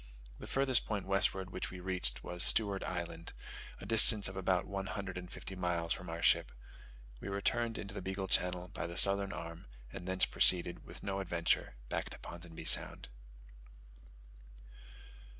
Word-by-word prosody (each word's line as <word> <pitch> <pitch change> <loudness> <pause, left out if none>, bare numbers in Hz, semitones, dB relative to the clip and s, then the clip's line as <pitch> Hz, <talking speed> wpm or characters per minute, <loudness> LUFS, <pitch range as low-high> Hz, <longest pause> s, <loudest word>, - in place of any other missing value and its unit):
The - - -9
farthest 135 -2 +1
point 105 -3 -3
westward 95 -1 +1
which - - -4
we 90 - -9
reached 90 -10 -1
was 90 0 -3
Stewart 100 +1 +5
Island, 85 -1 -5 0.5
a - - -9
distance 110 -2 +4
of 95 - -8
about 95 -1 0
one 95 -1 -5
hundred 100 -3 -5
and 90 -1 -7
fifty 95 - -8
miles 85 -2 -1
from 90 -1 -8
our 85 0 -5
ship. - - +3 0.7
We - - -8
returned 115 +4 -1
into 100 -1 -6
the - - -6
Beagle 95 +1 -4
Channel 90 -1 0
by 100 - -5
the 85 +1 -7
southern 100 0 +3
arm, 85 -2 -8 0.3
and 90 - -8
thence 95 0 +2
proceeded, 85 -1 +3
with - - -11
no 100 0 -3
adventure, 85 -8 -1
back - - -3
to - - -8
Ponsonby 85 -1 -10
Sound. - - +4
95 Hz, 165 wpm, -33 LUFS, 90-100 Hz, 0.7 s, Stewart